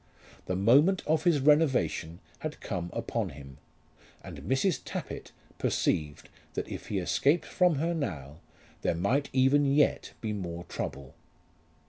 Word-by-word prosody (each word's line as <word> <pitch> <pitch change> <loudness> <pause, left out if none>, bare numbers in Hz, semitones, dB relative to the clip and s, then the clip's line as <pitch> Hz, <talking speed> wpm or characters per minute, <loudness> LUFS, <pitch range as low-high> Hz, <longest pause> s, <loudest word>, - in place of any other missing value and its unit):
The 90 - -1
moment 140 - +4
of 155 +2 +1
his 170 -4 +4
renovation 130 - +2 0.2
had 155 -1 -5
come 90 -4 -4
upon - - -2
him, 70 -1 -12 0.6
and - - -8
Mrs. 145 +7 +1
Tappitt - - -6 0.3
perceived 75 -2 0 0.3
that - - -2
if - - -7
he 100 - -2
escaped 140 - +2
from 180 -3 +2
her 165 +5 0
now, 80 - -4 0.4
there - - +1
might 120 - +1
even 135 +2 +4
yet 145 +1 +2
be 110 -2 -3
more 85 -4 -5
trouble. 70 -5 -6
130 Hz, 135 wpm, -29 LUFS, -, 0.6 s, moment